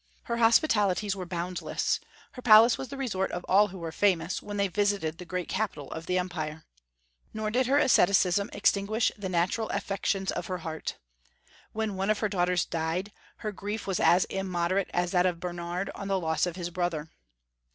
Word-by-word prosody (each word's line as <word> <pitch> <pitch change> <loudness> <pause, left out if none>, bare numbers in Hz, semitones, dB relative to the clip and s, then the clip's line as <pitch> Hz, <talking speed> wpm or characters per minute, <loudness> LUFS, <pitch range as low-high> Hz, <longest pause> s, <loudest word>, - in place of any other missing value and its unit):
Her 235 -4 -2
hospitalities 215 - +3
were 185 -2 -6
boundless; 175 +1 -2 0.3
her 250 - -10
palace 230 0 +7
was 265 - -6
the 275 - -8
resort 200 -8 -1
of 175 - -4
all 205 +3 +5
who 195 -1 -10
were 165 -2 -5
famous, 180 -2 +1
when 205 0 -6
they 200 0 +2
visited 195 -4 0
the 180 - -7
great 180 0 -3
capital 190 -9 -3
of 160 +1 -7
the 185 - +1
empire. 160 -4 -3 0.7
Nor 215 0 -2
did 250 +2 +2
her 275 +2 +3
asceticism 200 -7 +4
extinguish 205 +2 +1
the 200 -3 -5
natural 185 +5 0
affections 195 -1 -1
of - - -4
her 185 - -2
heart. 160 -1 -4 0.7
When 220 -2 -2
one 195 +2 -1
of 215 - +3
her 215 - -1
daughters 180 -2 +1
died, 165 +5 -2 0.3
her 215 - -1
grief 205 +2 -5
was 195 -3 -1
as 175 +3 +5
immoderate 185 0 -1
as 175 0 0
that 180 -1 +3
of 175 -2 -2
Bernard 175 +1 -4
on 200 - -6
the 195 -1 +1
loss 160 0 0
of 175 - -4
his 175 -1 -4
brother. 170 -3 -2
190 Hz, 185 wpm, -28 LUFS, 175-205 Hz, 0.7 s, palace